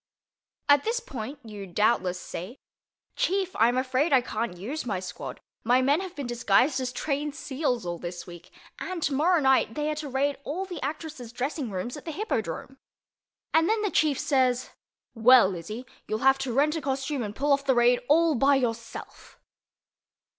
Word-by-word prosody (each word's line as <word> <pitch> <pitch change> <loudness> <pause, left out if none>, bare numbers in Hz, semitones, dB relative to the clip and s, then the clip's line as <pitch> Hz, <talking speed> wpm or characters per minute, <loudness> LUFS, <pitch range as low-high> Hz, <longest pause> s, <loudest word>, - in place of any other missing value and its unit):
At 285 -1 +6
this 465 +2 0
point 270 - -7
you 205 -3 -8
doubtless 185 -1 +1
say, 185 +9 -7 0.6
"Chief, 380 0 0
I'm 235 +3 +3
afraid 260 +4 +1
I 265 -2 +6
can't 220 -6 -3
use 255 - -4
my 205 -6 -2
squad. 180 -1 -7 0.2
My 250 +3 +3
men 285 +6 +3
have 375 -2 -7
been 285 - -4
disguised 240 +3 +2
as 250 -1 -2
trained 290 +2 -2
seals 265 - -2
all 175 -1 -4
this 175 0 -6
week, 175 0 -12 0.3
and 365 -3 -4
tomorrow 320 +5 +3
night, 265 -5 +3
they 300 0 -1
are - - -2
to 300 -2 -5
raid 275 +2 0
all 350 +8 -3
the 360 -3 -7
actresses' 295 -4 -5
dressing 260 +2 -3
rooms 200 +7 -4
at - - -11
the 325 - -4
Hippodrome" 270 - -3 0.7
and 325 +3 +4
then 440 -1 +1
the 410 - 0
Chief 300 -4 +2
says, 255 -3 +1 0.4
"Well, 230 -3 +6
Izzy, 210 +9 -6 0.2
you'll 215 +4 -2
have 270 0 +5
to 270 -2 -2
rent 290 +6 +2
a 320 - -2
costume 270 0 -2
and 210 -2 -5
pull 285 +1 +2
off 280 0 +1
the 265 -2 +3
raid 240 +1 +4
all 325 +2 +5
by 275 +2 +4
yourself." 230 -3 -4
265 Hz, 180 wpm, -27 LUFS, 230-300 Hz, 0.7 s, At